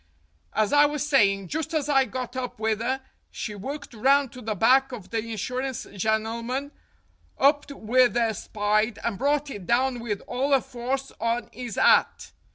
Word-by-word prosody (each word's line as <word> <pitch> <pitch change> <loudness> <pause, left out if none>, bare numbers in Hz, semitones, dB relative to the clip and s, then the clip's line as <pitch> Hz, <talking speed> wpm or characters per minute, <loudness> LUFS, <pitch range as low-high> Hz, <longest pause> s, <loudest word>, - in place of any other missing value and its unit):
"As 215 +2 +1
I 290 0 +7
was 295 0 -3
saying, 195 - +3
just 320 +1 -3
as 295 -2 0
I 270 -2 +4
got 255 -1 -5
up 255 -1 -4
with 220 0 0
'er, 260 +3 -1 0.3
she 215 - -5
worked 265 +8 -7
round 270 +3 +3
to 250 - -10
the 215 -2 -3
back 265 +6 +4
of 220 -7 -9
the 230 - 0
insurance 245 +4 -4
gennelman, 230 +6 -1 0.7
upped 285 +1 +3
with 245 -1 +2
'er 230 -2 +2
spide, 215 +1 0
and 215 -5 -2
brought 285 +1 +1
it 195 -7 -8
down 250 +1 +2
with 215 -4 -3
all 270 +3 +1
'er 265 - +2
force 260 +3 -4
on 230 +2 -1
'is 245 -4 -6
'at. - - +3
245 Hz, 170 wpm, -25 LUFS, 220-270 Hz, 0.7 s, I